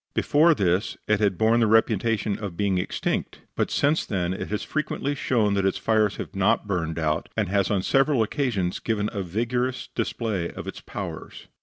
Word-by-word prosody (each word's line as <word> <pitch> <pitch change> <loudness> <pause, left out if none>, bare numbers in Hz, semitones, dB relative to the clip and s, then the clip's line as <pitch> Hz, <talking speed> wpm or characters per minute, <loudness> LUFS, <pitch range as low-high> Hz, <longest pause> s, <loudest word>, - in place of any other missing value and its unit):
Before 160 +3 +4
this 95 -3 0
it 105 -1 +2
had 100 -4 +1
borne 110 +1 +3
the 115 - +3
reputation 110 -1 +2
of 100 -5 -6
being 100 -3 +1
extinct, - - -2
but - - 0
since 150 +3 +2
then 90 -3 -1
it - - -5
has 105 - -3
frequently 150 -2 -2
shown 115 -6 +1
that 100 -1 +1
its 95 - +1
fires 110 -2 +2
have - - -7
not 100 +3 +2
burned 85 -5 -2
out, 80 -1 -1
and 105 -4 0
has 100 -1 +1
on 100 -3 +1
several 135 -1 +3
occasions 110 - -1
given 105 -2 -1
a 100 - -2
vigorous 120 +7 -2
display 100 -8 -2
of - - -8
its - - -7
powers. - - -7
105 Hz, 185 wpm, -25 LUFS, 95-115 Hz, -, Before